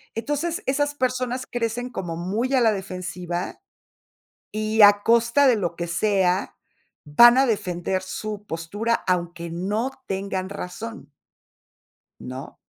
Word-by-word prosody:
Entonces, 295 +9 -2
esas 290 +2 +1
personas 255 -1 -1
crecen 240 +1 -2
como 175 -8 -4
muy 215 +10 -2
a 260 - +4
la 225 - +5
defensiva 180 -2 -5 0.9
y, 215 +1 -1
a 205 0 +7
costa 235 +4 +4
de 240 - +4
lo 175 -4 -2
que 170 - -3
sea, 190 +1 +1 0.5
van 235 +12 +7
a 270 - +5
defender 190 -4 -1
su 210 +2 -6
postura, 205 +8 -2
aunque 175 -1 -1
no 205 +9 -1 0.2
tengan 190 -1 -3
razón. 200 0 -7 1.1
¿No? 130 +2 -8
205 Hz, 125 wpm, -24 LUFS, 180-235 Hz, 1.1 s, a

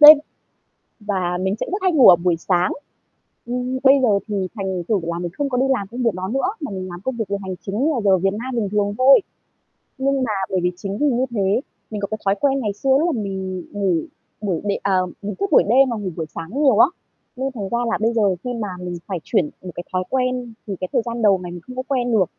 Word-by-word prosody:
đêm 300 0 +12 0.8
và 190 -4 -1
mình 190 +1 0
sẽ - - -1
rất 395 +1 -2
hay 370 - +3
ngủ 275 -5 +7
ở 180 - +10
buổi 175 0 +1
sáng. 175 +1 +1 0.7
Ừm, 250 +2 -2
bây 270 0 +7
giờ 210 -6 +3
thì 200 -3 -1
thành 190 -4 -3
thử 215 -3 +2
là 170 0 -3
mình 175 -1 -4
không 285 -1 0
có 250 - -1
đi 260 - +3
làm 245 -7 +1
công 245 +4 -5
việc 230 - +2
đó 185 +1 -4
nữa, 270 - 0
mà 290 - -4
mình 185 -1 -5
làm 175 0 -8
công 260 +4 -3
việc 225 -2 -2
về 200 - 0
hành 190 -1 -4
chính 200 +2 -3
như 315 - +3
là 245 - -1
giờ 190 -2 +5
Việt 195 +2 +1
Nam 245 +4 -4
bình 215 -4 0
thường 205 -1 +1
thôi. 265 +2 +7 0.8
Nhưng 270 0 +1
mà 225 - -1 0.2
bởi 190 - +1
vì 180 - +2
chính 195 +2 -4
vì 295 - +1
như 255 -1 +2
thế, 200 +1 +1 0.3
mình 210 -1 -4
có 200 - -1
cái 215 - -1
thói 195 0 +3
quen 275 -1 +2
ngày 210 -5 -1
xưa 270 +7 -3
lúc 330 0 +1
mà 225 - -2
mình 190 -2 -4
ngủ 200 -3 +1 0.5
buổi 190 -6 -1
đêm 200 -1 -1
à, 195 -1 +1 0.3
mình 205 0 -4
thức 200 - -1
buổi - - +7
đêm 260 +5 +4
mà 235 - -1
ngủ 200 -3 -3
buổi 160 - -3
sáng 195 - -3
nhiều 265 -7 +5
á, - - +8 0.5
nên 265 +2 -2
thành 200 -4 -4
ra 235 - 0
là - - +1
bây 225 +1 +2
giờ 205 -5 +2
khi 250 - -3
mà 225 -3 -3
mình 180 -1 -5
phải 190 -4 -3
chuyển 150 - +1
một 180 - -6
cái 175 - -5
thói 185 - +1
quen 255 -2 -1
thì 200 - -3
cái 185 - -2
thời - - +3
gian 235 0 -4
đầu 200 -3 +5
này 175 - -6
mình 175 0 -8
không 255 - -8
có 255 - -3
quen 250 -3 0
được, 210 -5 +4
210 Hz, 270 wpm, -21 LUFS, 190-250 Hz, 0.8 s, đêm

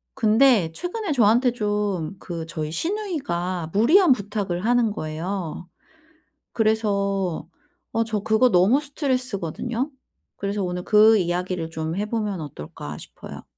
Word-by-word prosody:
근데 225 -5 +4
최근에 360 - -3
저한테 240 +1 +4
좀 205 -5 -2
그 170 -2 -6
저희 155 -2 -4
시누이가 185 - -2
무리한 310 - +5
부탁을 200 -5 -1
하는 240 -2 +3
거예요. 175 0 -5 0.8
그래서 200 -6 0 0.4
어 230 - +1
저 220 -2 -2
그거 220 +5 +3
너무 200 +9 +4
스트레스거든요. 255 - -2 0.5
그래서 200 0 -2
오늘 180 0 -3
그 215 0 +6
이야기를 175 -1 -2
좀 160 0 -4
해 205 +2 -2
보면 210 -5 -2
어떨까 75 - -8
싶어요. - - -10
205 Hz, 280 characters per minute, -23 LUFS, 175-240 Hz, 0.8 s, 그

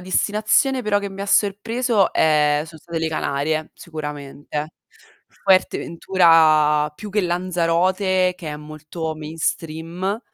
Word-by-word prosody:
destinazione 215 +8 +1
però 210 -2 +1
che 200 0 -4
mi 195 0 -9
ha 200 - -3
sorpreso, 215 +2 +1
ehm, 150 -1 +3
sono 160 -1 -13
state 170 -1 -5
le 160 0 -1
Canarie, 155 +1 -2
sicuramente, 150 -1 -7 0.7
Fuerte 190 -1 +3
Ventura 160 -4 +3
più 210 +5 -9
che 210 +1 +1
Lanzarote 180 +1 +1
che 165 -4 -8
è 150 - -5
molto 155 +1 -6
mainstream. 165 +5 -3
165 Hz, 120 wpm, -21 LUFS, 155-195 Hz, 0.7 s, ehm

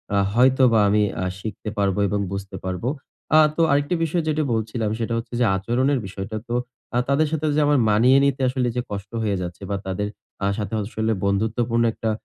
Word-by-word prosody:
আ - - +3 0.2
হয়তোবা 125 -1 +4
আমি 105 +1 +3 0.2
আ - - -1
শিখতে 110 +1 -6
পারবো 100 -1 +1
এবং 105 +1 -1
বুঝতে 100 0 -5
পারবো। 95 +6 -2 0.5
আ - - +8 0.2
তো 165 - +1
আরেকটি 145 +4 +2
বিষয় 165 +1 0
যেটা 155 0 +1
বলছিলাম, 110 0 -1
সেটা 115 0 -2
হচ্ছে 115 +1 -6
যে 125 - +4
আচরণের 125 +7 +1
বিষয়টা। 95 +3 -6
তো 120 - -3 0.4
আ - - +3
তাদের 150 +3 +3
সাথে 155 -1 -1
যে - - +3
আমার 145 -2 +4
মানিয়ে 120 +6 +5
নিতে 135 -1 0
আসলে 125 -1 0
যে 125 - 0
কষ্ট 100 0 -6
হয়ে 105 -2 0
যাচ্ছে 90 +1 -6
বা 100 - -1
তাদের 95 +2 -2 0.4
আ - - +2
সাথে 105 0 -4
আসলে 110 +2 -2
বন্ধুত্বপূর্ণ 110 +4 +1
একটা 110 - -3
115 Hz, 195 wpm, -23 LUFS, 100-130 Hz, 0.5 s, আ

